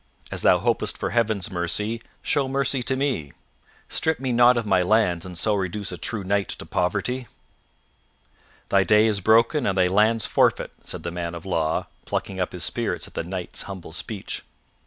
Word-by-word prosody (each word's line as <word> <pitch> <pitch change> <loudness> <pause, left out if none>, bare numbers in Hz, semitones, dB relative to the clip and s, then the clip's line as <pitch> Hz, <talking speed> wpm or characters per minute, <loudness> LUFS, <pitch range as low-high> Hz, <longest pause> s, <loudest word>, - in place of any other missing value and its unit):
"As - - -3
thou - - +5
hopest - - 0
for - - -2
Heaven's 110 -5 +1
mercy, 105 +6 -1 0.2
show 140 -2 +1
mercy 135 -1 0
to 130 +2 0
me. 130 - -1 0.5
Strip 160 -3 0
me 130 -1 -2
not 120 +1 +6
of 115 - -1
my 95 -3 +3
lands 90 -3 +2
and 90 -2 -7
so 105 +4 +1
reduce 100 +1 -2
a - - -4
true 105 -3 -2
knight 100 0 +1
to - - -6
poverty." 105 +8 -1 1.4
"Thy 100 - +4
day 105 +2 +5
is 105 -2 +2
broken 115 - +4
and 95 - 0
thy 90 - +5
lands 105 +4 +3
forfeit," - - +2
said - - -6
the 85 - -3
man 85 -1 -4
of 85 - -9
law, 80 -4 0 0.2
plucking 95 -1 -3
up 90 - -1
his 90 -2 -4
spirits - - -2
at - - -17
the - - -2
Knight's 90 +1 -4
humble 95 -4 -7
speech. 105 +3 -4
100 Hz, 185 wpm, -24 LUFS, 90-115 Hz, 1.4 s, not